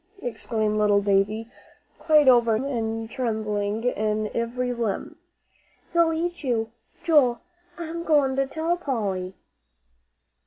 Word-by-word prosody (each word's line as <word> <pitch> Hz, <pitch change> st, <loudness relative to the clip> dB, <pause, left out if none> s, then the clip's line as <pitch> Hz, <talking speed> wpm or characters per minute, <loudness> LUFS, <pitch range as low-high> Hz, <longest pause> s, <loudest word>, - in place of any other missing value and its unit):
exclaimed 220 Hz, -3 st, -1 dB
little 205 Hz, -1 st, +4 dB
Davie, 200 Hz, +2 st, +1 dB, 0.5 s
quite 305 Hz, -3 st, +4 dB
overcome, 235 Hz, -1 st, +4 dB
and 225 Hz, -4 st, -2 dB
trembling 215 Hz, -2 st, -2 dB
in 215 Hz, -3 st, -1 dB
every 245 Hz, +2 st, -2 dB
limb. 230 Hz, -5 st, -3 dB, 0.8 s
"He'll 335 Hz, -1 st, +4 dB
eat 345 Hz, +1 st, -3 dB
you. 225 Hz, -4 st, -1 dB, 0.3 s
Joel, 285 Hz, -8 st, +3 dB, 0.4 s
I'm 335 Hz, 0 st, -5 dB
going 290 Hz, -5 st, +3 dB
to 275 Hz, 0 st, +1 dB
tell 325 Hz, +4 st, -1 dB
Polly." 200 Hz, -, -3 dB
235 Hz, 110 wpm, -25 LUFS, 215-285 Hz, 0.8 s, little